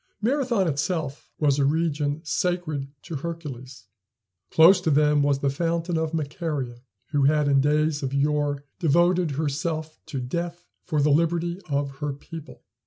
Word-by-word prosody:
Marathon 235 Hz, -4 st, +1 dB
itself 155 Hz, -1 st, -2 dB
was 145 Hz, -2 st, +2 dB
a -, -, +3 dB
region 150 Hz, 0 st, 0 dB
sacred 160 Hz, -4 st, -1 dB, 0.2 s
to 160 Hz, -, -5 dB
Hercules. 135 Hz, -, -7 dB, 0.6 s
Close 180 Hz, +4 st, +7 dB
to 165 Hz, -, 0 dB
them 150 Hz, 0 st, +4 dB
was 140 Hz, -1 st, +2 dB
the 140 Hz, -, +2 dB
fountain 170 Hz, +3 st, -1 dB
of 160 Hz, -1 st, 0 dB
Macaria, 145 Hz, -5 st, -3 dB, 0.3 s
who 145 Hz, -2 st, +2 dB
had 150 Hz, 0 st, +3 dB
in 140 Hz, -1 st, +4 dB
days 150 Hz, +1 st, +2 dB
of 135 Hz, -2 st, -2 dB
yore 145 Hz, 0 st, 0 dB, 0.2 s
devoted 175 Hz, +1 st, +3 dB
herself 155 Hz, +1 st, -2 dB
to 135 Hz, -, -4 dB
death 170 Hz, +7 st, -4 dB, 0.2 s
for 155 Hz, -5 st, 0 dB
the 150 Hz, -, +4 dB
liberty 170 Hz, +3 st, +1 dB
of 140 Hz, -1 st, -2 dB
her 145 Hz, -2 st, -2 dB
people. 155 Hz, +2 st, -10 dB
155 Hz, 150 wpm, -25 LUFS, 140-170 Hz, 0.6 s, Close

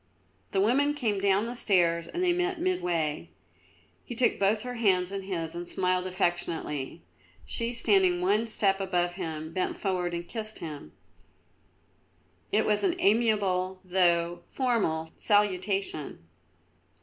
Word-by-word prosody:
The 195 Hz, -, +1 dB
woman 275 Hz, +8 st, +3 dB
came 220 Hz, -8 st, 0 dB
down 200 Hz, +2 st, +3 dB
the 235 Hz, -, -4 dB
stairs 170 Hz, -7 st, +2 dB
and 355 Hz, -, -3 dB
they 355 Hz, -1 st, +3 dB
met 360 Hz, 0 st, -1 dB
midway. 170 Hz, -, -1 dB, 0.7 s
He 240 Hz, -, -7 dB
took 245 Hz, +1 st, +2 dB
both 210 Hz, +2 st, +2 dB
her 250 Hz, 0 st, -5 dB
hands 190 Hz, -6 st, +2 dB
in 195 Hz, 0 st, -3 dB
his 170 Hz, -4 st, -4 dB
and 175 Hz, 0 st, -6 dB
smiled 185 Hz, 0 st, 0 dB
affectionately; 170 Hz, -, -2 dB, 0.4 s
she, 230 Hz, 0 st, -2 dB
standing 195 Hz, -6 st, +3 dB
one 205 Hz, +5 st, +2 dB
step 195 Hz, -3 st, +1 dB
above 175 Hz, -2 st, 0 dB
him, 160 Hz, -3 st, -5 dB
bent 185 Hz, -, -1 dB
forward 180 Hz, -3 st, -1 dB
and 170 Hz, 0 st, -5 dB
kissed 220 Hz, -2 st, -5 dB
him. 150 Hz, -, -8 dB, 1.6 s
It 215 Hz, +1 st, +2 dB
was 210 Hz, -1 st, +3 dB
an 365 Hz, -3 st, +2 dB
amiable, 200 Hz, -, +2 dB
though 175 Hz, -2 st, +2 dB
formal, 215 Hz, -12 st, 0 dB
salutation. 195 Hz, -, 0 dB
190 Hz, 135 wpm, -28 LUFS, 175-220 Hz, 1.6 s, woman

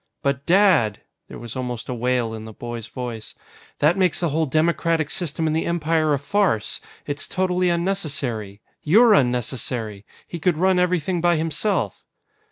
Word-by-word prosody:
"But, 140 Hz, 0 st, -1 dB
Dad!" 175 Hz, -, +4 dB, 0.3 s
There -, -, -9 dB
was 120 Hz, -2 st, -8 dB
almost 125 Hz, -2 st, -4 dB
a 125 Hz, -, -3 dB
wail 120 Hz, -1 st, 0 dB
in 110 Hz, 0 st, -7 dB
the 110 Hz, -, -9 dB
boy's 120 Hz, 0 st, -7 dB
voice. 120 Hz, -3 st, -7 dB, 0.4 s
"That 165 Hz, +6 st, +3 dB
makes 185 Hz, -1 st, +2 dB
the 170 Hz, -, 0 dB
whole 160 Hz, +2 st, 0 dB
democratic 160 Hz, +1 st, +1 dB
system 165 Hz, -2 st, -2 dB
in 155 Hz, -, +1 dB
the 160 Hz, -, 0 dB
Empire 160 Hz, -2 st, +1 dB
a -, -, -1 dB
farce! 145 Hz, -, 0 dB, 0.2 s
It's 145 Hz, 0 st, -3 dB
totally 185 Hz, -1 st, +1 dB
unnecessary! 145 Hz, -, -2 dB, 0.2 s
You're 220 Hz, +8 st, +6 dB
unnecessary! 120 Hz, -, -1 dB, 0.2 s
He 170 Hz, -, -6 dB
could 170 Hz, -1 st, +1 dB
run 185 Hz, +1 st, +3 dB
everything 180 Hz, -1 st, 0 dB
by 175 Hz, 0 st, +3 dB
himself!" 160 Hz, -, -1 dB
155 Hz, 160 wpm, -22 LUFS, 120-175 Hz, 0.4 s, You're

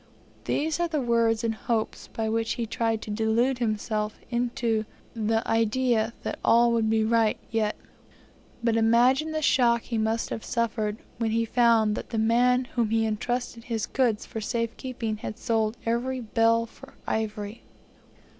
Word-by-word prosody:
These 315 Hz, +2 st, 0 dB
are 345 Hz, -, +2 dB
the 315 Hz, -3 st, -1 dB
words 230 Hz, -2 st, +2 dB
and 225 Hz, -1 st, +1 dB
hopes 220 Hz, 0 st, -2 dB
by 225 Hz, -1 st, -3 dB
which 225 Hz, +1 st, 0 dB
he 235 Hz, -, -3 dB
tried 225 Hz, 0 st, -1 dB
to 210 Hz, -, -6 dB
delude 230 Hz, +4 st, +1 dB
himself 215 Hz, -2 st, -1 dB
into 235 Hz, -2 st, 0 dB, 0.3 s
the 225 Hz, -1 st, 0 dB
idea 225 Hz, 0 st, +1 dB
that -, -, -4 dB
all 235 Hz, +1 st, +5 dB
would 225 Hz, -2 st, +1 dB
be 220 Hz, 0 st, +2 dB
right 225 Hz, -1 st, +2 dB
yet; 220 Hz, -2 st, 0 dB, 0.9 s
but 230 Hz, -1 st, +2 dB
imagine 245 Hz, +7 st, +3 dB
the 310 Hz, 0 st, -2 dB
shock 235 Hz, -5 st, +3 dB
he 230 Hz, -2 st, -2 dB
must 220 Hz, +1 st, -1 dB
have 225 Hz, -, -4 dB
suffered, 220 Hz, -3 st, -1 dB, 0.2 s
when 230 Hz, -1 st, 0 dB
he 230 Hz, +1 st, +1 dB
found 230 Hz, -2 st, +3 dB
that -, -, -5 dB
the 230 Hz, -, -3 dB
man 245 Hz, +3 st, +3 dB
to 250 Hz, -, -15 dB
whom 235 Hz, -3 st, 0 dB
was 225 Hz, 0 st, +2 dB
entrusted 230 Hz, +2 st, -2 dB
his 225 Hz, -3 st, -2 dB
goods 240 Hz, -5 st, 0 dB
for 220 Hz, -, -6 dB
safe 230 Hz, +1 st, -2 dB
keeping 235 Hz, -4 st, -4 dB
had 215 Hz, +1 st, -6 dB
sold 225 Hz, -1 st, 0 dB
every 245 Hz, +3 st, -1 dB
bale 230 Hz, 0 st, +2 dB
for 230 Hz, -, -15 dB
ivory. 215 Hz, 0 st, -3 dB
230 Hz, 165 wpm, -26 LUFS, 220-240 Hz, 0.9 s, all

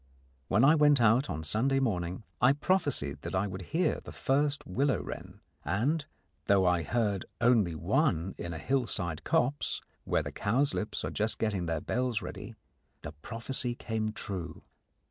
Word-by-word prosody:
When 110 Hz, -, +4 dB
I 150 Hz, -, +7 dB
went 150 Hz, -3 st, +5 dB
out 120 Hz, +4 st, +4 dB
on 80 Hz, +1 st, -3 dB
Sunday 120 Hz, -, +1 dB
morning, 95 Hz, -6 st, -1 dB, 0.2 s
I 125 Hz, +2 st, +6 dB
prophesied 145 Hz, -, 0 dB
that -, -, -4 dB
I 95 Hz, +2 st, +2 dB
would 95 Hz, -1 st, -5 dB
hear 175 Hz, +3 st, +1 dB
the -, -, -9 dB
first 140 Hz, +1 st, 0 dB
willow 135 Hz, +9 st, +1 dB
wren, -, -, -8 dB, 0.2 s
and, 145 Hz, +9 st, 0 dB, 0.4 s
though 100 Hz, -2 st, +4 dB
I 90 Hz, -1 st, +3 dB
heard 105 Hz, 0 st, 0 dB
only 115 Hz, -8 st, +3 dB
one 80 Hz, +3 st, +1 dB
in 85 Hz, -, -4 dB
a 80 Hz, -, -4 dB
hill 130 Hz, -, 0 dB
side 85 Hz, -7 st, -3 dB
copse 140 Hz, +4 st, 0 dB, 0.2 s
where -, -, +1 dB
the -, -, -5 dB
cowslips 120 Hz, +1 st, 0 dB
are -, -, -3 dB
just 110 Hz, +1 st, 0 dB
getting 100 Hz, -6 st, -1 dB
their 80 Hz, -2 st, -1 dB
bells 125 Hz, -2 st, 0 dB
ready, -, -, -8 dB, 0.5 s
the 75 Hz, -, -5 dB
prophecy 115 Hz, -, -3 dB
came 110 Hz, -2 st, -2 dB
true. 90 Hz, -6 st, -6 dB
110 Hz, 165 wpm, -30 LUFS, 90-135 Hz, 0.5 s, I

